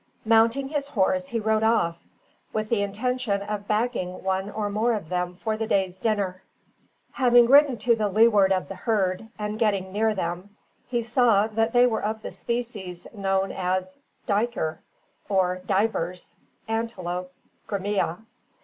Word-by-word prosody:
Mounting 230 +5 +3
his 290 -2 -2
horse, 275 +4 +1
he 235 -4 -2
rode 220 0 +1
off, 220 -7 +2 0.6
with 215 0 -2
the 230 -4 +1
intention 210 0 -1
of 205 0 -5
bagging 210 -5 -1
one 190 +1 -1
or 210 0 -3
more 215 +4 +1
of 200 -8 -4
them 180 0 -2
for 220 +4 -2
the 220 0 -3
day's 190 -2 0
dinner. 195 -4 -1 0.7
Having 245 -2 +5
ridden 275 0 +6
to 235 +2 +2
the 215 -2 0
leeward 210 -2 +4
of 185 -1 +1
the - - -6
herd, 205 -2 -1
and 210 0 -4
getting 200 -4 +1
near 215 +1 +1
them, 185 +3 -4 0.3
he 240 -2 -1
saw 230 -3 +3
that 225 +1 0
they 245 0 +6
were 225 -3 0
of 215 +1 -3
the - - -5
species 220 -7 -5
known 195 -2 0
as 185 0 -2 0.3
"Duyker," 205 -7 -1 0.5
or 185 -2 +1
Divers 185 -4 -1 0.3
(Antelope 185 -6 -3 0.4
grimmia). 200 -1 -2
210 Hz, 150 wpm, -25 LUFS, 190-230 Hz, 0.7 s, ridden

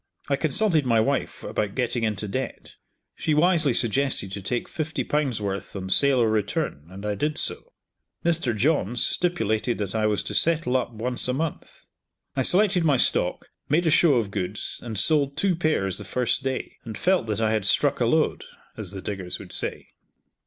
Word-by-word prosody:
I - - +3
consulted 190 -9 +2
my 115 -3 +2
wife 110 - -1
about 105 -1 -3
getting 120 -2 -1
into 110 -1 -1
debt. 130 +5 -5 0.4
She 155 - -1
wisely 160 -2 +3
suggested 120 -3 +1
to 100 0 -5
take 120 +5 -2
fifty 155 -1 -3
pounds 145 -7 -1
worth 100 -2 -4
on 95 -1 -5
sale 140 +3 +4
or 115 - +3
return, 100 -8 -2
and 95 +2 -9
I 105 - 0
did 150 +9 -2
so. - - 0 0.5
Mr 160 -9 +1
Johns 120 - +1
stipulated 115 - 0
that 100 -2 -3
I 110 -1 +1
was 105 -1 0
to - - -5
settle 165 -5 +2
up 125 -2 0
once 120 +3 -3
a 125 - 0
month. 155 +3 -5 0.5
I 135 - +1
selected 185 +4 +3
my 145 -4 +3
stock, - - +1 0.2
made 165 +5 +2
a 160 - +3
show 160 -3 +5
of 110 -5 0
goods, 100 0 -4
and 115 -3 -6
sold 140 +6 +3
two 190 +2 +2
pairs 155 - 0
the - - -6
first 125 +7 +1
day, 130 -1 -4
and 110 -3 -7
felt 185 -9 +1
that 105 -1 -1
I 110 -1 +1
had 110 -3 0
struck 100 - +2
a - - +2
lode, - - +1 0.3
as 105 -3 -6
the 95 - -7
diggers 95 -3 -4
would - - -11
say. - - -4
120 Hz, 190 wpm, -25 LUFS, 105-150 Hz, 0.5 s, show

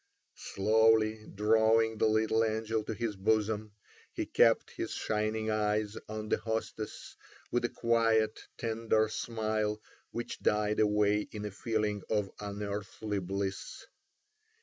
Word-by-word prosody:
Slowly 110 +1 +3
drawing 110 +1 +3
the 110 - +4
little 110 +1 +2
angel 110 0 -1
to - - -3
his 115 -2 -2
bosom, 105 +1 0 0.4
he - - -3
kept - - +3
his - - -4
shining 110 0 -1
eyes 105 0 0
on 110 0 -5
the - - +3
hostess, 110 -1 -4 0.4
with 120 0 +1
a - - 0
quiet, 115 -2 +2 0.2
tender 110 -1 +1
smile 110 -2 -1 0.3
which 120 0 -5
died 105 0 +1
away 105 0 +3
in 105 -1 -5
a 105 - -4
feeling 105 0 -1
of 105 -3 0
unearthly 105 0 -4
bliss. 95 +1 -4
110 Hz, 125 wpm, -31 LUFS, 105-110 Hz, 0.4 s, the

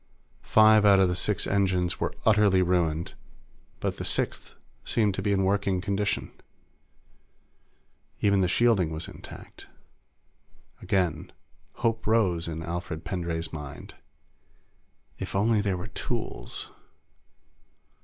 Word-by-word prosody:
Five 110 -1 +5
out 100 -2 +6
of 95 -1 +4
the 90 - -1
six 105 +3 0
engines 95 -3 0
were - - -2
utterly 105 -4 +4
ruined, 85 -2 0 0.7
but - - -2
the - - -5
sixth - - -1 0.3
seemed 105 -4 +1
to - - -3
be 105 - 0
in 95 -1 +2
working 100 -1 +1
condition. 100 +1 -2 1.9
Even 100 -2 +3
the 90 - +2
shielding 100 -3 +3
was 80 +1 -5
intact. - - -12 1.1
Again, 85 -5 -1 0.5
hope 115 -1 0
rose 95 -7 +2
in 80 0 -5
Alfred 85 -1 -5
Pendray's 85 -3 -3
mind. 75 -3 -8 1.3
If - - -5
only 105 +2 +3
there 100 -3 -1
were 90 - -6
tools! - - -4
95 Hz, 115 wpm, -27 LUFS, 85-105 Hz, 1.9 s, out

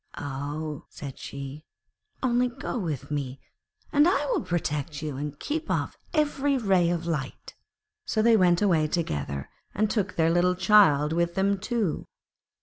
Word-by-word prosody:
'Ah,' 145 +2 -4
said 140 -3 -8
she, 140 +2 -7 0.6
'only 250 0 +3
go 245 0 -4
with 155 - -4
me, 140 -2 -3 0.5
and 295 +2 +6
I 365 - +2
will 435 - +1
protect 150 -3 -2
you 150 -3 -3
and 145 +1 -5
keep 315 +2 -3
off - - -1 0.2
every 285 -3 +1
ray 190 -7 +3
of 170 -1 -1
light.' 150 -6 -4 0.5
So 220 - +1
they 230 0 +6
went 180 -2 +4
away 165 -6 +3
together, 70 - -2 0.3
and 215 +1 +1
took 205 -4 -1
their 165 0 +3
little 180 +1 +3
child 175 -6 +5
with 170 +1 0
them 195 0 +2
too. 210 -4 -1
170 Hz, 150 wpm, -27 LUFS, 150-215 Hz, 0.6 s, and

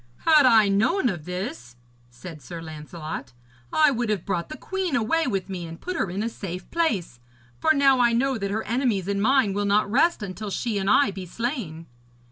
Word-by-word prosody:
'Had 305 -4 +6
I 220 -4 +6
known 225 - +2
of 175 -7 -5
this,' 150 - -6 0.3
said 150 +6 -11
Sir 165 +7 -8
Lancelot, 155 -4 -7 0.4
'I 305 -2 +4
would 240 -3 -2
have 205 -5 -1
brought 170 -3 -2
the 310 - -7
queen 380 -5 -2
away 280 +7 +1
with 195 -6 -2
me 180 -3 -5
and 165 +1 -9
put 365 - -5
her 205 - -1
in 195 +4 -3
a - - -1
safe 185 -5 -6
place, 215 - -1 0.4
for 315 - +3
now 275 -3 +4
I 240 -1 +4
know 255 +1 +1
that 200 -1 -2
her 220 +2 -2
enemies 230 -5 0
and 200 0 -1
mine 255 -3 +3
will 205 +1 -1
not 205 0 +2
rest 310 0 +2
until 200 +2 -5
she 215 +1 -2
and 195 0 -1
I 280 -1 +4
be 190 -1 -8
slain.' 210 - -4
205 Hz, 205 wpm, -24 LUFS, 180-260 Hz, 0.4 s, Had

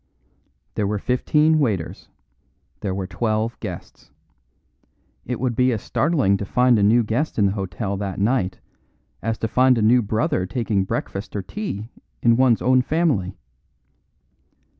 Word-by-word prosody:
There 105 - -1
were 105 +1 -1
fifteen 150 +8 +2
waiters. 105 - -2 0.7
There 95 -2 -3
were 95 -1 -3
twelve 110 +4 -2
guests. - - -8 1.2
It 125 - -3
would 125 -2 -1
be 125 +1 +3
as 110 -3 -3
startling 135 - +1
to 100 - -4
find 125 +1 +3
a - - +2
new 115 +4 +4
guest 120 +9 -2
in 105 - +3
the 95 - +2
hotel 100 0 -3
that 95 -2 -4
night 100 -3 0 0.6
as 115 +1 -2
to 110 - -2
find 125 +2 +3
a - - +1
new 120 +3 +5
brother 105 -3 -1
taking 105 -4 -1
breakfast 100 +2 -4
or 100 - -2
tea 120 - -5 0.3
in 115 -1 +5
one's 125 -2 +3
own 130 +1 +4
family. 130 - 0
110 Hz, 150 wpm, -22 LUFS, 100-125 Hz, 1.2 s, new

